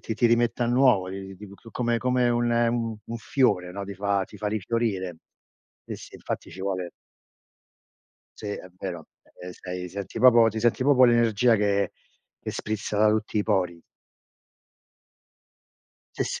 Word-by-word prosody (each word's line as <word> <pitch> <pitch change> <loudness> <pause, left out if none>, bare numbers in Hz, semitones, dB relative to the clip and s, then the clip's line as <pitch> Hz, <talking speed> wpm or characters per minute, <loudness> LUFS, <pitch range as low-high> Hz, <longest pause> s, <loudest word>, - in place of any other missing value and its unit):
ti 110 - -4
ti 120 +2 +3
rimette 120 +1 +2
a - - 0
nuovo, 120 -6 +3
ti 95 0 -7
ti 105 +1 -11 0.2
come 120 -1 0
come 125 -1 +2
un 120 -1 +1
un 115 - -5
fiore, 100 -8 +1
no, 100 +1 -5
ti 100 - -7
fa 100 0 0
ti 105 - -14
fa 105 +1 -2
rifiorire. 105 -4 -2 0.7
Sì, - - -3
sì - - -13
infatti - - -6
ci 95 - -10
vuole 95 -2 -3 1.5
Sì - - -8
è 90 - -7
vero, 85 -4 -6 0.4
ehm, 90 - -6
stai 90 0 -6
senti 95 +1 -6
proprio 120 -3 +7
ti 110 0 -4
senti 120 +2 +2
proprio 130 -2 +5
l'energia 120 -1 +4
che 100 -1 +1 0.5
che - - -4
sprizza 105 -1 -4
da 105 +1 +5
tutti 110 0 -1
i 105 - +2
pori. 90 -6 0 2.3
Sì, - - 0
s - - -4
105 Hz, 155 wpm, -26 LUFS, 95-120 Hz, 2.3 s, proprio